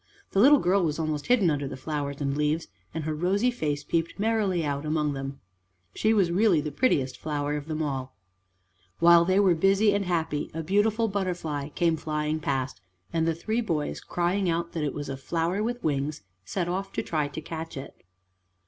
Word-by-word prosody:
The 195 - +1
little 280 +7 +8
girl 190 -4 +2
was 155 -3 0
almost 155 -2 -2
hidden 220 -9 +4
under 145 -2 -1
the 135 - -6
flowers 140 0 -3
and 140 -1 0
leaves, 150 +2 0 0.2
and 160 - -4
her 155 +1 -2
rosy 195 +10 +1
face 150 -11 -2
peeped 165 +2 -1
merrily 205 -5 +1
out 140 0 -2
among 150 -1 0
them. 135 0 -5 0.5
She 215 - +2
was 195 -6 +3
really 190 -2 +4
the 150 0 -3
prettiest 140 - +1
flower 145 -1 -2
of 150 0 -5
them 155 0 -2
all. 135 -3 -3 0.8
While 170 0 +7
they 185 +2 +3
were 190 -3 +5
busy 195 +5 +3
and 200 -1 0
happy, 160 -4 -1
a 165 - -3
beautiful 210 +6 +2
butterfly 175 -8 -2
came 165 +1 +1
flying 150 0 -2
past, 135 -8 -2 0.3
and 165 0 +1
the 165 - +1
three 220 +8 -1
boys, 160 -9 -2
crying 180 +2 0
out 170 0 -1
that 160 - -3
it 145 - -2
was 145 -1 -4
a 135 - -3
flower 165 +7 -1
with 240 +2 -2
wings, 145 -3 -1 0.2
set 175 - -2
off 190 +2 -2
to - - -2
try 155 -3 -1
to 145 - -6
catch 160 0 -6
it. 135 - -9
160 Hz, 195 wpm, -27 LUFS, 150-190 Hz, 0.8 s, little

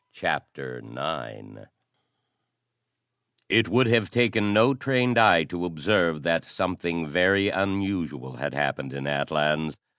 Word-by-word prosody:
CHAPTER 65 -2 -4
IX - - -8 1.8
It 115 -1 +4
would 125 +3 +3
have 115 -3 +2
taken 115 -3 +1
no 110 +6 +4
trained 125 -2 +1
eye 95 -7 +6
to 90 +2 -6
observe 85 -2 0
that 85 -1 +1
something 85 -2 -3
very 95 +6 +3
unusual 95 -10 -3
had 70 +1 -5
happened 70 -2 -2
in 70 0 -6
Atlans. 75 +1 -1
90 Hz, 115 wpm, -25 LUFS, 75-110 Hz, 1.8 s, eye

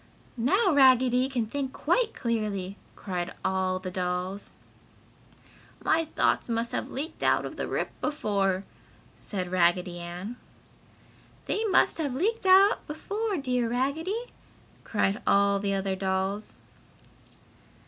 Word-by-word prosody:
"Now 370 - +3
Raggedy 260 -2 +5
can 245 -4 -1
think 265 +3 -4
quite 485 -3 +1
clearly!" 210 -5 -2 0.2
cried 180 -2 -4
all 190 -1 +1
the 185 0 -6
dolls. 180 +2 -3 1.3
"My 325 0 +3
thoughts 310 - 0
must 230 0 -1
have - - -3
leaked 295 +5 -6
out - - +3
the - - -3
rip - - -2
before!" 200 -10 0 0.5
said 185 -3 -5
Raggedy 175 0 +2
Ann. 175 +7 -6 1.1
"They 440 - -1
must 390 -4 +3
have 285 -5 -1
leaked 405 - 0
out 385 +2 +6
before, 405 +7 -3
dear 250 -4 0
Raggedy!" 320 - -2 0.5
cried 205 0 0
all 200 0 +4
the 200 0 0
other 195 0 -1
dolls. 190 +2 -2
230 Hz, 115 wpm, -27 LUFS, 190-295 Hz, 1.3 s, out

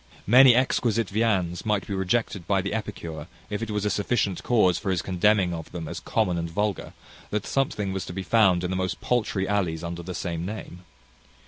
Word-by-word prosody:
Many 125 +3 +8
exquisite 115 -4 +1
viands 95 -5 0
might 105 -3 0
be 100 - -5
rejected 95 -1 -1
by 100 -1 +2
the 100 - -3
epicure, 100 -7 -5 0.2
if 105 +1 -2
it 115 - -4
was 105 -1 -1
a 105 - +1
sufficient 100 -2 0
cause 105 -8 +3
for - - -3
his 90 -2 0
contemning 95 0 +2
of 80 -1 -7
them 85 -2 -6
as - - -5
common 90 -2 0
and 85 0 -3
vulgar, 105 +3 -2 0.4
that 105 -1 -2
something 105 -8 -1
was 95 - -4
to - - -6
be 95 +1 -4
found 95 -5 +3
in 90 - -2
the - - -1
most 95 0 -2
paltry 110 -5 0
alleys 90 -5 -1
under 85 0 -5
the 90 +1 -6
same 85 0 -3
name. 90 -2 -7
95 Hz, 205 wpm, -25 LUFS, 90-105 Hz, 0.4 s, Many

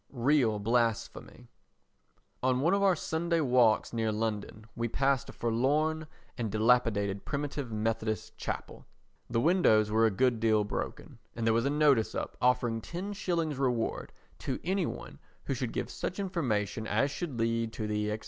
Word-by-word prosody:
Real 125 -3 +2
Blasphemy 115 +2 -1 0.9
On 130 0 +2
one 165 +6 +3
of 200 - +2
our 195 -2 +4
Sunday 165 +1 -1
walks 125 -7 +3
near 110 -1 0
London 110 0 -3
we 115 0 -1
passed 135 +1 0
a - - -6
forlorn 150 +7 0 0.3
and 110 -3 -2
dilapidated 110 -3 +2
Primitive 145 -3 -3
Methodist 110 0 -2
Chapel. - - -6 0.4
The 115 - +1
windows 115 - +4
were 115 +1 +4
a - - +3
good 120 +2 +1
deal 110 -1 +3
broken 105 - -5 0.2
and 115 - -2
there 115 - +4
was 115 +2 +1
a - - +2
notice 145 -6 +3
up - - -4
offering 120 -2 +2
10/ 170 - -3
reward 125 -4 -1 0.3
to 130 - -3
any 190 +3 0
one - - -8 0.3
who - - -1
should - - -3
give - - -3
such - - -4
information 115 - -1
as 130 +7 +1
should 145 -3 -4
lead 115 0 0
to 110 - -4
the, 105 0 -1
&c. 105 - -1
120 Hz, 160 wpm, -30 LUFS, 110-145 Hz, 0.9 s, our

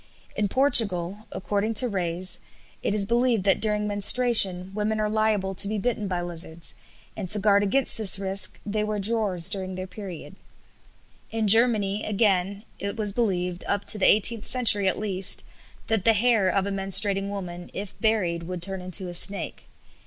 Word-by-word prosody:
In 205 0 -2
Portugal, 205 -6 +3
according 205 +3 -4
to 250 +4 +5
Reys, 185 -3 -3 0.4
it 205 - -2
is 200 -2 +1
believed 235 -1 -1
that 195 0 0
during 210 -1 -1
menstruation 205 -3 +3
women 215 +1 -3
are 215 - -1
liable 215 -3 -1
to 195 +2 +2
be 215 +1 -4
bitten 215 -1 -3
by 180 -2 -4
lizards, 170 -1 -4 0.4
and 190 -4 -7
to 210 - +5
guard 200 0 +2
against 225 +5 -1
this 200 -3 +4
risk 195 0 +2
they 210 0 -3
wear 210 0 -4
drawers 200 -5 0
during 190 -1 -5
the 185 0 -7
period. 185 -3 -11 0.9
In 225 -1 -3
Germany, 215 -2 +4
again, 200 -2 -1 0.2
it 200 +1 -6
was 210 -2 0
believed, 180 -6 -3
up 205 0 -3
to 210 - +5
the - - +3
eighteenth 215 +1 +1
century 215 -6 +4
at 190 - -1
least, 195 -2 +1 0.4
that 220 -4 -2
the 225 - +3
hair 220 -3 +1
of 195 +1 -1
a 200 - -5
menstruating 195 0 +2
woman, 175 -3 -8
if 200 0 -8
buried, 200 -7 -1
would 175 0 -7
turn 190 0 -2
into 185 +1 -2
a 175 - -8
snake. 195 +3 +1
200 Hz, 175 wpm, -23 LUFS, 185-215 Hz, 0.9 s, to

